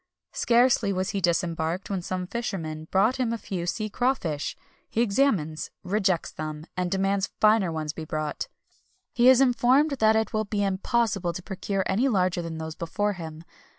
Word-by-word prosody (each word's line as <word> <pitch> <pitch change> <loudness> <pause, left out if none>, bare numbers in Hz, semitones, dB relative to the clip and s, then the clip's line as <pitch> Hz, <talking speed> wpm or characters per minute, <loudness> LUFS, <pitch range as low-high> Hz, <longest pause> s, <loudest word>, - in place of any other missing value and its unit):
Scarcely 240 -3 +3
was 190 +1 -1
he 200 -2 -2
disembarked 170 +1 0
when 190 -2 -1
some 185 +1 -3
fishermen 170 -7 -4
brought 210 +7 +3
him 250 -3 0
a 230 - -1
few 180 -5 -4
sea 215 +4 -1
crawfish; 205 - -1 0.3
he - - -2
examines, 200 - +1
rejects 190 -2 0
them, 155 0 -6
and 180 -1 -1
demands 195 +1 0
finer 215 -4 +4
ones 155 -1 -3
to - - -28
be 160 - -5
brought. 155 -1 -3 0.7
He 245 +1 +6
is 260 0 +7
informed 260 +4 +4
that 220 0 +5
it 220 0 0
will 215 0 0
be 205 0 -1
impossible 195 -2 0
to 185 - -7
procure 195 0 -2
any 225 +8 +2
larger 185 -6 +1
than 165 -1 -5
those 160 0 -5
before 205 +6 -1
him. 160 -3 -8
195 Hz, 175 wpm, -26 LUFS, 170-220 Hz, 0.7 s, is